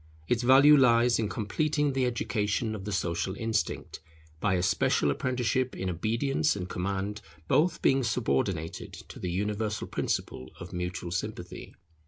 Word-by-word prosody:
Its 120 -1 +1
value 135 +4 +7
lies 120 -3 +4
in 110 -2 0
completing 145 +7 0
the 130 -1 +1
education 110 -2 -1
of 100 -3 -6
the 105 - -4
social 95 0 -1
instinct, 110 0 -2 0.4
by 100 0 +1
a 90 - 0
special 75 -5 +2
apprenticeship 130 - -1
in 95 0 -2
obedience 115 - 0
and 90 -3 -4
command, 100 +3 -3 0.3
both 160 - +2
being 135 0 +4
subordinated 110 -8 -1
to - - -11
the 90 - -3
universal 105 +3 -2
principle 65 - -3
of 90 +1 -9
mutual 90 0 -4
sympathy. 90 -1 -5
110 Hz, 145 wpm, -28 LUFS, 95-125 Hz, 0.4 s, value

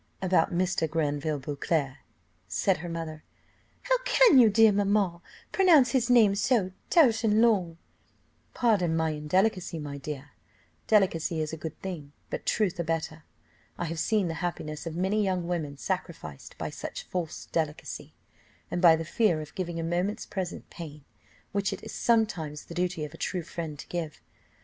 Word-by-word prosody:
"About 185 -3 +2
Mr. 175 -2 0
Granville 150 -1 -1
Beauclerc," 140 0 -2 0.5
said 185 - +1
her 175 +1 -6
mother. 165 -2 -5 0.6
"How - - +2
can - - +6
you, 230 -3 +7
dear 220 +1 +6
mamma, 200 -3 +1 0.3
pronounce 320 -10 +5
his 250 -2 +1
name 225 -5 +6
so 200 -2 +1 0.2
tout 235 -10 +5
an 215 -1 +3
long?" 195 -8 +3 0.8
"Pardon 200 -9 +2
my 160 -1 +1
indelicacy, 175 +4 0
my 145 -2 -6
dear; 145 0 -7 0.6
delicacy 180 -5 +2
is 155 0 -2
a - - -4
good 160 -1 -7
thing, 160 -7 -6 0.2
but - - -5
truth 190 -5 +1
a - - +1
better. 160 -1 -3 0.5
I 175 - -2
have 165 0 -4
seen 210 +1 +1
the 165 - -2
happiness 160 -3 -4
of 165 - -5
many 190 +4 +1
young 185 -3 -1
women 155 -5 -3
sacrificed 160 - -5
by - - -4
such - - -6
false 175 -3 -4
delicacy, 155 -3 -3 0.6
and 175 - -1
by 170 -3 +8
the 165 0 -4
fear 185 -2 +2
of 155 -1 -8
giving 175 -3 -3
a - - -2
moment's 175 +5 -1
present 185 -3 -5
pain, 150 -4 -9 0.5
which 200 -1 0
it - - -6
is - - -8
sometimes 180 -11 0
the - - -9
duty 175 -3 -1
of 150 - -10
a - - -10
true 180 0 -2
friend 160 -2 -6
to - - -9
give." 165 -4 -4
175 Hz, 170 wpm, -28 LUFS, 155-200 Hz, 0.8 s, by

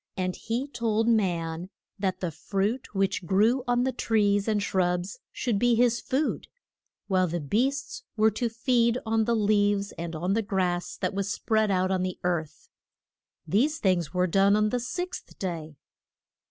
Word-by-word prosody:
And 185 -1 -1
he 240 +5 -3
told 225 -4 0
man 175 -6 0 0.3
that 190 -1 -1
the 180 -3 -1
fruit 200 - -2
which 190 -2 0
grew 220 +8 +3
on 245 0 +2
the 260 - +1
trees 205 -4 +1
and 215 -2 +2
shrubs 180 -1 -1
should 230 -6 -1
be 240 +1 +3
his 235 0 +3
food, 280 +4 -1 0.6
while 185 -2 +2
the 170 +1 -2
beasts 260 - -1 0.2
were 220 +1 +4
to 235 +3 -1
feed 235 0 +2
on 220 0 +1
the 235 - +2
leaves, 205 -1 +2
and 170 -1 -4
on 180 +5 -1
the 225 - +2
grass 185 -4 -1
that - - -2
was 200 0 -2
spread 220 +1 +1
out 185 -1 +1
on 185 -1 +1
the 185 -1 -2
earth. 170 -4 -2 0.8
These 280 - +2
things 180 -5 +1
were 180 0 +1
done 195 +3 +4
on 215 0 +2
the 250 - 0
sixth 355 +10 -5
day. 160 -5 -5
205 Hz, 165 wpm, -27 LUFS, 185-230 Hz, 0.8 s, were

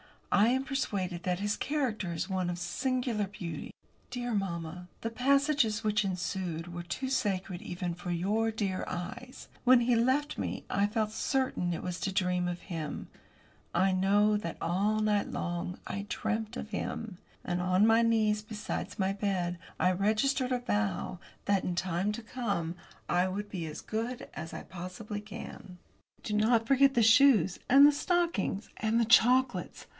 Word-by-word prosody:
I 205 +2 +5
am 260 +2 +2
persuaded 195 -10 -2
that 180 0 -1
his 205 0 0
character 245 - -1
is 165 +4 -3
one 185 -2 0
of 175 - -3
singular 230 +4 -1
beauty. 175 -6 -6 0.4
Dear 245 -1 -3
mamma, 180 -3 -3
the 230 - -2
passages 270 -2 +2
which 210 -1 +2
ensued 180 -2 -3
were 175 - -4
too 215 +10 -3
sacred 190 -8 -1
even 175 -1 -4
for 175 +1 -5
your 205 +6 +1
dear 200 -4 -2
eyes. 245 +8 -6 0.2
When 250 -1 +7
he 240 0 +3
left 260 +6 +1
me - - -3
I 200 +1 +2
felt 215 0 -1
certain 255 -8 0
it - - -5
was 180 -1 -3
to 195 - -2
dream 180 -2 +1
of 175 0 -4
him. 160 -5 -5 0.7
I 190 +2 +4
know 205 +3 +3
that, 170 -5 -5
all 205 +5 +1
night 210 -1 +1
long, 175 +1 -3
I 200 +1 -4
dreamt 220 +2 -2
of 215 - -5
him. 205 -1 -4 0.3
And, 175 0 -1
on 185 +3 +3
my 225 +1 +5
knees, 220 -2 +2
beside 215 0 -5
my 190 -1 +1
bed, 190 -3 -1 0.2
I 180 - +4
registered 220 +7 +1
a 250 - +1
vow 205 -6 -1 0.3
that, 200 -2 +2
in - - 0
the - - -3
time 185 +3 0
to 235 - -6
come, 200 -9 -2 0.3
I 180 +1 +3
will 195 +2 -3
be 180 -5 -5
as 155 0 -7
good 230 +3 -4
as 160 - -7
I - - -6
possibly 185 +4 -6
can. 205 -3 -9 0.5
Do 210 - -3
not 225 +2 +3
forget 275 +1 +5
the 235 - +5
shoes, 225 -5 +6
and 275 +3 +9
the 295 - +8
stockings, 295 - 0
and 220 +1 +1
the 230 - +3
chocolates! 250 +2 +3
205 Hz, 170 wpm, -30 LUFS, 180-235 Hz, 0.7 s, and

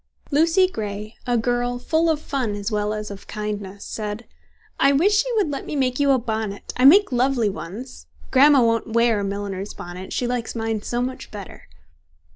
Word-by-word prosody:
Lucy 330 +6 +4
Grey, 210 - -5
a 245 -1 +2
girl 245 +1 0
full 320 +6 +1
of 315 -2 +1
fun 255 -8 -2
as 205 +2 -4
well 210 0 0
as 215 -1 -4
of 195 - -10
kindness, 205 -2 -5
said, 215 +1 -5 0.5
"I 275 +1 +5
wish 405 +9 +4
you - - -3
would 390 -8 +1
let 275 - -5
me - - -4
make 255 -2 0
you 285 -1 +3
a 270 - +5
bonnet; 220 -4 -4
I 250 - +2
make 390 +5 +7
lovely 250 -3 +2
ones. 190 +10 -8 0.2
Grandma 275 0 +6
won't 230 -1 0
wear 230 -2 +3
a - - -2
milliner's 200 0 -4
bonnet, 180 +2 -8
she 245 - -1
likes 245 -1 -2
mine 225 -1 -2
so 240 +3 -2
much 255 +1 -5
better." 200 -4 -10
235 Hz, 190 wpm, -22 LUFS, 210-275 Hz, 0.5 s, make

